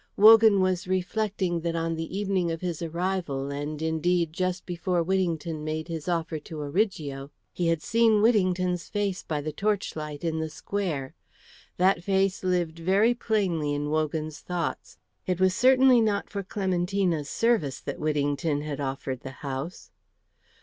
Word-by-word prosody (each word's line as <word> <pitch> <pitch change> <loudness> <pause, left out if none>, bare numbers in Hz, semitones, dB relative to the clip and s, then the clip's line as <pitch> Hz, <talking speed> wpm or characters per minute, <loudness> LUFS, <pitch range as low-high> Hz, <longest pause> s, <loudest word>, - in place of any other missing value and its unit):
Wogan 215 -1 +8
was 185 -1 0
reflecting 185 -1 -1
that 170 0 -2
on 165 0 -1
the 165 +3 -4
evening 195 -4 0
of 165 -1 -3
his 175 -3 -3
arrival, 170 -5 -2
and 145 +1 -4
indeed 160 +1 +1
just 185 +1 -2
before 175 0 -1
Whittington 170 -4 -1
made 155 +2 -3
his 165 -1 -5
offer 165 -2 -1
to 155 +1 -9
Origo, 145 -4 -2 0.2
he 175 - -1
had 165 -2 +1
seen 225 -2 +4
Whittington's 185 -5 +2
face 205 -3 -1
by 150 -2 -3
the 155 +1 -3
torchlight 155 -7 -2
in 160 -1 -1
the 160 0 -2
square. 155 -6 -3 0.6
That 185 -1 +3
face 195 0 +1
lived 175 -3 0
very 195 +7 +3
plainly 185 -11 0
in 145 +1 -2
Wogan's 155 0 -1
thoughts. 175 -2 -4 0.3
It 180 -1 0
was 185 -1 +4
certainly 255 +1 +5
not 210 -2 0
for 200 - -3
Clementina's 185 -5 -1
service 220 - +1
that - - -5
Whittington 145 0 0
had 150 -2 -5
offered 135 -1 -3
the 135 - -8 0.2
house. 140 +6 -5
175 Hz, 150 wpm, -27 LUFS, 155-190 Hz, 0.6 s, Wogan